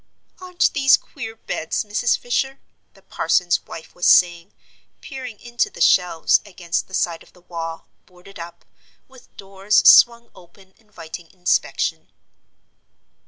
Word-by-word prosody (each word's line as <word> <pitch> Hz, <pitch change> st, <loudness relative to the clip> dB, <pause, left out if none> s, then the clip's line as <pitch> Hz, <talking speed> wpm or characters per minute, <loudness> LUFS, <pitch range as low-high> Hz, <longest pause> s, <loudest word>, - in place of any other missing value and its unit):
"Aren't 360 Hz, -1 st, 0 dB
these 270 Hz, -2 st, +4 dB
queer 225 Hz, -6 st, -9 dB
beds, 160 Hz, -7 st, -4 dB
Mrs. 215 Hz, +3 st, 0 dB
Fisher?" 265 Hz, +2 st, -2 dB, 0.4 s
the -, -, -22 dB
parson's 175 Hz, -1 st, 0 dB
wife 160 Hz, -, -11 dB
was 175 Hz, -, -1 dB
saying, 175 Hz, +1 st, +4 dB, 0.5 s
peering 255 Hz, -5 st, -9 dB
into 240 Hz, 0 st, -2 dB
the -, -, -14 dB
shelves 175 Hz, -2 st, +3 dB
against 180 Hz, -4 st, -4 dB
the 190 Hz, -, -7 dB
side 170 Hz, -2 st, -1 dB
of -, -, -20 dB
the 180 Hz, -, -22 dB
wall, 165 Hz, -2 st, -7 dB, 0.2 s
boarded 180 Hz, +1 st, -16 dB
up, 170 Hz, 0 st, -11 dB, 0.4 s
with 260 Hz, -1 st, -21 dB
doors 195 Hz, +1 st, +1 dB
swung 235 Hz, 0 st, +6 dB
open 190 Hz, +2 st, -20 dB
inviting 175 Hz, -6 st, -11 dB
inspection. 180 Hz, -1 st, -2 dB
190 Hz, 130 wpm, -20 LUFS, 175-235 Hz, 0.5 s, swung